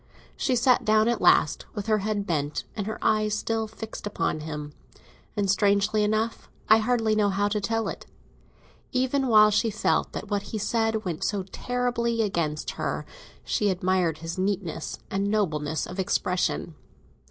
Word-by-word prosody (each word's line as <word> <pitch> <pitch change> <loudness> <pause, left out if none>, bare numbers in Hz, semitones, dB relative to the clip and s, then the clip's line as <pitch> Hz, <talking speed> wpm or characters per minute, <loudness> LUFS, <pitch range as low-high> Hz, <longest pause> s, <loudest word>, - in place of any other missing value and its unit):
She 260 - 0
sat 250 +1 +4
down 215 +1 +4
at 240 - 0
last, - - +4
with 205 -2 -4
her 215 -1 +2
head 205 0 -2
bent 150 -4 -1
and 205 -2 -3
her 220 - -3
eyes 215 -1 +2
still 225 0 -1
fixed 220 -1 -7
upon 190 - -1
him; 150 -1 -6 0.6
and 200 -1 +1
strangely 200 +2 +3
enough—I 220 0 +1
hardly 225 -1 +1
know 210 -1 +3
how 200 +1 +1
to 210 0 -1
tell 225 +2 -1
it—even 260 +1 -5
while 215 -2 +7
she 225 +2 +2
felt 215 0 0
that - - -5
what 205 -1 +1
he 220 - -3
said 225 0 0
went 170 -4 -3
so 200 -3 0
terribly 235 +2 -1
against 160 -7 -1
her, - - -2 0.4
she 210 - +1
admired 180 -3 +1
his 165 +3 -6
neatness 190 -3 -2
and 195 +1 0
nobleness 155 -8 0
of 185 - -8
expression. 180 -2 0
210 Hz, 155 wpm, -26 LUFS, 185-225 Hz, 0.6 s, while